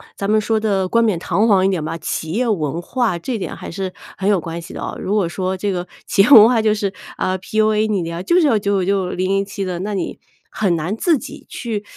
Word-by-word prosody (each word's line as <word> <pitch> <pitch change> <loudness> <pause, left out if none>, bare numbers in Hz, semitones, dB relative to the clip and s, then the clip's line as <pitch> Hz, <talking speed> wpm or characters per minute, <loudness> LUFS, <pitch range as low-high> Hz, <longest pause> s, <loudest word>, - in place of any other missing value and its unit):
咱 200 - -3
们 215 0 +4
说 220 +1 +1
得 195 -4 0
冠 230 +4 +2
冕 215 -6 +2
堂 205 +5 +1
皇 195 -4 +4
一 - - +3
点 180 -5 -1
吧， 155 +2 -4
企 160 0 -4
业 245 +4 0
文 165 -6 -1
化 230 -2 -1
这 230 +7 -3
点 195 - -5
还 - - -8
是 190 +2 -4 0.3
很 195 +1 0
有 200 -3 +3
关 165 +1 -5
系 - - -10
的 - - -7
啊。 - - -4
如 200 - -1
果 200 -5 +2
说 185 +1 -2
这 200 +2 -2
个 180 -1 -3 0.2
企 - - +3
业 200 - +4
文 225 -6 +10
化 235 -2 +3
就 215 -1 +3
是， 200 -2 -2 0.2
啊 185 0 -1
，PUA 215 +2 +1
你 200 -4 0
呀， 170 +1 -4
就 345 - +1
是 335 - +3
要 225 -6 +3
996、 195 -2 0
007 195 +2 -1
的， 180 -2 -3
那 205 +3 -3
你 195 - -3 0.3
很 190 -5 +1
难 165 +6 -2
自 330 +4 +3
己 - - -10
去， 220 -4 -4
195 Hz, 265 characters per minute, -19 LUFS, 185-215 Hz, 0.3 s, 文